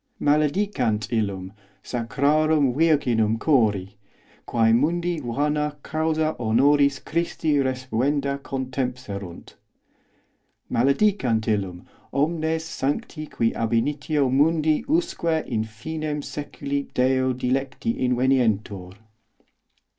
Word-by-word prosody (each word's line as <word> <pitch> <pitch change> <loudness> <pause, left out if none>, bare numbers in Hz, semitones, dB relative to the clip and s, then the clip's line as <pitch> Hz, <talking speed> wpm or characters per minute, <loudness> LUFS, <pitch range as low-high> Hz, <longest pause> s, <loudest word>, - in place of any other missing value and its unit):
os - - -7
Maledicant 145 - +1
illum 100 -4 -2 0.3
sacrarum 140 +4 +1
virginum 125 -8 +2
chori, 105 -9 +2 0.5
quæ 115 -1 +3
mundi 170 +5 0
vana 150 +3 -1
causa 155 0 0
honoris 140 +5 +3
Christi 160 -1 -1
respuenda 135 +2 -1
contempserunt. 125 -9 -5 1.2
Male 125 +4 +3
os 140 - +2
dicant 130 - +1
illum 95 -5 -2 0.3
omnes 160 +2 0
sancti 155 +1 -3
qui 115 -5 0
ab 115 0 -2
initio 145 +4 +1
mundi 155 +2 +2
usque 295 - 0
in 110 -4 -1
finem 150 +7 -5
seculi 140 -1 -4
Deo 130 0 +2
dilecti 135 - -1
inveniuntur. 115 -7 +1
135 Hz, 95 wpm, -24 LUFS, 115-155 Hz, 1.2 s, quæ